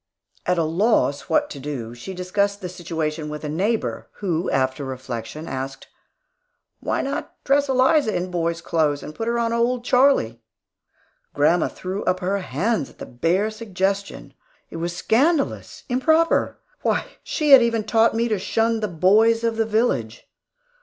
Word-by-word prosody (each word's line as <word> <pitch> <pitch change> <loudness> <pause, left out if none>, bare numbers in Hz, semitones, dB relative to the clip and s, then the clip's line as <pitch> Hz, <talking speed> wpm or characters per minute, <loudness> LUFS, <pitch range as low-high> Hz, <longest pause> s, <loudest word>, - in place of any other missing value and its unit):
At 180 - +2
a 165 - +2
loss 165 -2 +1
what 295 -1 +2
to 140 - -7
do, 130 -5 -5
she 120 +11 -8
discussed 200 +2 -1
the 185 -3 -5
situation 160 -3 -4
with 150 0 -6
a 150 - -3
neighbor, 200 +9 -1
who 180 -4 -2
after 130 +1 0
reflection 130 +2 -6
asked, 135 +1 -6 0.9
"Why - - -1
not 275 +1 -4
dress 280 0 +2
Eliza 265 -1 +3
in 180 +1 -2
boy's 170 -1 -1
clothes 150 -4 0
and 150 - -8
put 225 +7 -4
her 235 0 0
on 230 -1 0
old 240 +1 0
Charlie?" 250 - +3 0.9
Grandma 160 +4 +3
threw 190 +2 -5
up 185 0 +1
her 195 +2 -1
hands 180 - -1
at - - -20
the - - -7
bare 175 - 0
suggestion. 200 -2 -3 0.4
It - - -6
was 170 +1 -3
scandalous, 280 +6 0
improper! 315 +6 +2 0.2
Why, - - 0 0.2
she 300 -3 -1
had 270 -2 +10
even 230 -2 +1
taught 225 +1 +3
me 230 +1 +1
to 215 -3 0
shun 225 +4 0
the 215 - -1
boys 215 +6 +3
of 230 -1 0
the 225 0 +1
village. 210 - -1
190 Hz, 160 wpm, -22 LUFS, 155-230 Hz, 0.9 s, had